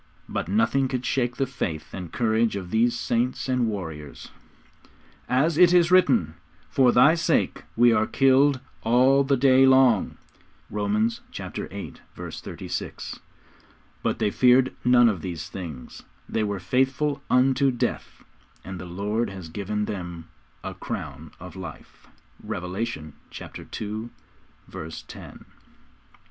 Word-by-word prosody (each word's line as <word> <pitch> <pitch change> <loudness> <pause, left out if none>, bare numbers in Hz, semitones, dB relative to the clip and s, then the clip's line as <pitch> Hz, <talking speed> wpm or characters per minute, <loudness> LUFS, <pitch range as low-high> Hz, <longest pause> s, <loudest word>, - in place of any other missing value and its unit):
But - - -3
nothing 205 -12 +2
could 125 -1 -3
shake 120 -2 0
the 135 - +1
faith 85 - -5
and 90 -3 -7
courage 110 -1 +1
of 90 -3 -6
these 120 +2 +2
saints 120 +4 -1
and 125 -2 +1
warriors. 80 -9 -6 1.0
'As 150 +6 +2
it 180 -1 +7
is 175 -1 +4
written, 125 - +4 0.4
For 130 -2 +4
Thy 140 +6 +6
sake 165 - 0
we 120 0 +5
are 110 -1 +2
killed 135 +1 +4 0.2
all 130 +4 +4
the 135 0 +1
day 135 0 +5
long.' 130 -5 +4 0.5
(Romans 105 +2 0
viii. - - -6 0.4
36.) - - -6 0.8
But - - -1
they 105 - 0
feared 125 +2 +4
none 125 -1 +6
of 100 -7 0
these 85 -1 -5
things; 80 -9 -8 0.3
they 110 - -1
were 100 -2 -2
faithful 135 +8 0
unto 130 +1 +3
death, 120 -2 -3 0.4
and 95 -1 -7
the 90 - -7
Lord 105 +6 -2
has 95 -4 -9
given 105 +4 -3
them 90 -5 -6 0.3
a - - -5
crown 75 +2 -6
of 90 -1 -10
life. 90 -5 -10 0.4
(Revelation 90 -3 -4 0.3
ii. - - -8 0.2
10.) 110 +2 -5 0.6
Romans 80 +1 -7
ix. - - -11
115 Hz, 130 wpm, -25 LUFS, 95-130 Hz, 1.0 s, it